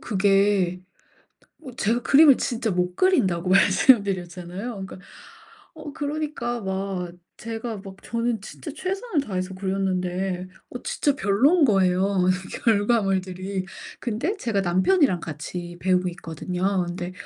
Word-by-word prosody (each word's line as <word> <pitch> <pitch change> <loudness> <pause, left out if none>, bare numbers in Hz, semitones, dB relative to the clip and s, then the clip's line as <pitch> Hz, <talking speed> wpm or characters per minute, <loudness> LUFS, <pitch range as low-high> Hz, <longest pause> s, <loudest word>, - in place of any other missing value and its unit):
그게 195 -3 +2 0.8
어 265 -4 -9
제가 235 +1 0
그림을 285 0 +7
진짜 235 -2 -1
못 180 -1 -1
그린다고 190 - +2
말씀 200 +5 +5
드렸잖아요. 180 +2 -5 0.2
그러니까 190 - -10 0.8
어 295 - -9
그러니까 290 -5 -3
막 190 -2 -3 0.2
제가 225 0 -5
막 190 -1 -9
저는 230 -1 -2
진짜 260 +9 -9
최선을 375 +2 -2
다해서 185 -1 -3
그렸는데 185 -1 -2 0.2
어 245 - -7
진짜 285 - 0
별로인 275 - +3
거예요 195 -3 +2
이 185 0 0 0.2
결과물들이. 195 -4 +1 0.3
근데 250 - -2
제가 220 - -1
남편이랑 190 - +3
같이 175 +3 -6
배우고 185 -1 +2
있거든요. 180 +3 -2
근데 175 +1 -5
195 Hz, 290 characters per minute, -24 LUFS, 185-240 Hz, 0.8 s, 그림을